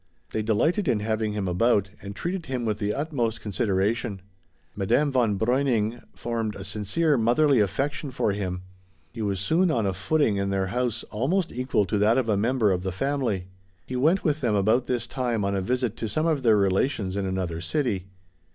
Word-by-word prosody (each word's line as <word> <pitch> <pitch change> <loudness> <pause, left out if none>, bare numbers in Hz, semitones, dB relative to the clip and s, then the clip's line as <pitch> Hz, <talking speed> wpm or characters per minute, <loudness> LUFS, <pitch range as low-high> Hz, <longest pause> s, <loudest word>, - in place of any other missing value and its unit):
They 110 - -1
delighted 155 - +1
in 115 -4 +2
having 110 0 -1
him 100 -2 -2
about, 100 +1 +2
and 100 0 -7
treated 175 - -3
him 125 -3 -2
with 105 -1 -1
the 105 -1 0
utmost 120 -3 -1
consideration. 100 0 -1 0.5
Madame 120 +9 +2
von 115 -6 +2
Breuning 120 -1 +1
formed 115 -3 -3
a 95 - -7
sincere, 110 - 0
motherly 125 +4 +4
affection 140 +8 -1
for 125 -5 0
him; 95 -2 -3 0.5
he 115 - -7
was 100 -3 -1
soon 165 - +2
on 115 -8 +1
a 95 - 0
footing 110 +2 +1
in 100 0 -1
their 95 -1 0
house 120 -2 -1
almost 160 - 0
equal 125 -5 0
to 100 +3 -1
that 110 +4 +4
of 125 -4 0
a 105 - +3
member 110 0 +2
of 90 -1 0
the 95 0 -2
family. 115 -4 -1 0.4
He 130 - -5
went 160 +9 +3
with 150 -1 0
them 115 -5 +1
about 110 +5 +2
this 120 -2 -1
time 120 -4 -1
on 100 0 0
a 95 - 0
visit 125 +2 -1
to 110 - -3
some 155 +9 0
of 155 -4 +1
their 115 -4 +4
relations 100 0 +1
in 100 -1 -1
another 90 -3 -2
city. 100 - -1
110 Hz, 195 wpm, -26 LUFS, 100-130 Hz, 0.5 s, motherly